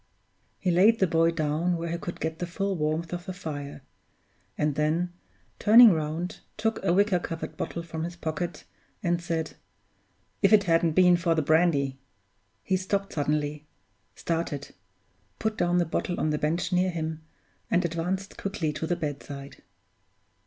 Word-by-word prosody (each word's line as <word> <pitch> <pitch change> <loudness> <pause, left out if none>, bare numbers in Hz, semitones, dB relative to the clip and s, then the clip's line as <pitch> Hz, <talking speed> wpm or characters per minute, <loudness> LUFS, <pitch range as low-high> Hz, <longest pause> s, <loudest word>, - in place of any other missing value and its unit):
He 185 - 0
laid 200 +7 +5
the 190 - +3
boy 165 -1 +3
down 165 +2 0
where 165 0 -4
he 170 - -1
could 175 - -6
get 160 0 -3
the 175 - -3
full 195 +2 -2
warmth 160 +1 -1
of 175 0 -5
the 185 - -3
fire; 145 -6 -6 0.7
and 150 0 +1
then, 160 +4 0 0.5
turning 225 +1 +9
round, 160 +2 -2 0.2
took 220 -1 -1
a 190 - +2
wicker 195 0 +3
covered 165 -1 -5
bottle 170 - -4
from 160 -1 -5
his 175 +1 -5
pocket, 165 0 -4 0.4
and 175 -1 +1
said, 165 -2 -2 0.9
"If 200 +1 +5
it 205 -1 +7
hadn't 165 -2 +2
been 180 0 +6
for 170 -1 +1
the 160 - +1
brandy 145 -4 +2 0.3
" 110 +3 -44
He 190 - +1
stopped 195 +1 -2
suddenly 150 0 -1 0.5
started 160 -4 -3 0.6
put 220 0 -1
down 175 -3 +1
the 175 - +3
bottle 175 +2 -2
on 155 - +1
the 150 - -1
bench 165 +5 -1
near 180 +1 +3
him 160 -2 -4 0.5
and 180 0 +2
advanced 180 +4 -3
quickly 165 -6 -2
to 160 +2 -3
the 175 - +1
bedside. 145 -3 -6
170 Hz, 165 wpm, -27 LUFS, 155-180 Hz, 0.9 s, turning